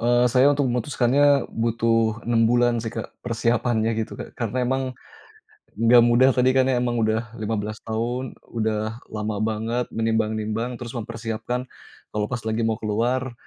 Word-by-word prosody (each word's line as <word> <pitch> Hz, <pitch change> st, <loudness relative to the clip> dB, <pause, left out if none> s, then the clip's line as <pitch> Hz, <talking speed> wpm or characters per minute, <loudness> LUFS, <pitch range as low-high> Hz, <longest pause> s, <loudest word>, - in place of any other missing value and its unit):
Eee, 120 Hz, +1 st, +3 dB
saya 130 Hz, +1 st, +5 dB
untuk 145 Hz, -1 st, +1 dB
memutuskannya 135 Hz, +3 st, +2 dB
butuh 115 Hz, 0 st, +1 dB
6 115 Hz, -1 st, +2 dB
bulan 120 Hz, 0 st, +3 dB
sih, 115 Hz, -, -4 dB
Kak, 115 Hz, -, -5 dB
persiapannya 115 Hz, -1 st, +1 dB
gitu, 110 Hz, -, -4 dB
Kak. -, -, -8 dB
Karena 125 Hz, +2 st, -1 dB
emang 130 Hz, +2 st, 0 dB, 0.9 s
nggak 115 Hz, +2 st, +6 dB
mudah 120 Hz, +3 st, +5 dB
tadi 125 Hz, 0 st, +4 dB
kan 130 Hz, -1 st, +4 dB
emang 125 Hz, -2 st, +1 dB
udah 110 Hz, +1 st, -1 dB
15 110 Hz, 0 st, -3 dB
tahun, 120 Hz, +3 st, -3 dB, 0.2 s
udah 110 Hz, +1 st, -1 dB
lama 105 Hz, 0 st, -2 dB
banget 115 Hz, +3 st, -1 dB
menimbang-nimbang, 110 Hz, +1 st, -1 dB
terus 120 Hz, -1 st, -7 dB
mempersiapkan 115 Hz, +1 st, -4 dB, 0.5 s
kalau 105 Hz, -1 st, -1 dB
pas 120 Hz, -2 st, -3 dB
lagi 110 Hz, +1 st, -1 dB
mau 110 Hz, -1 st, 0 dB
keluar, 120 Hz, +4 st, -1 dB
115 Hz, 145 wpm, -23 LUFS, 110-125 Hz, 0.9 s, nggak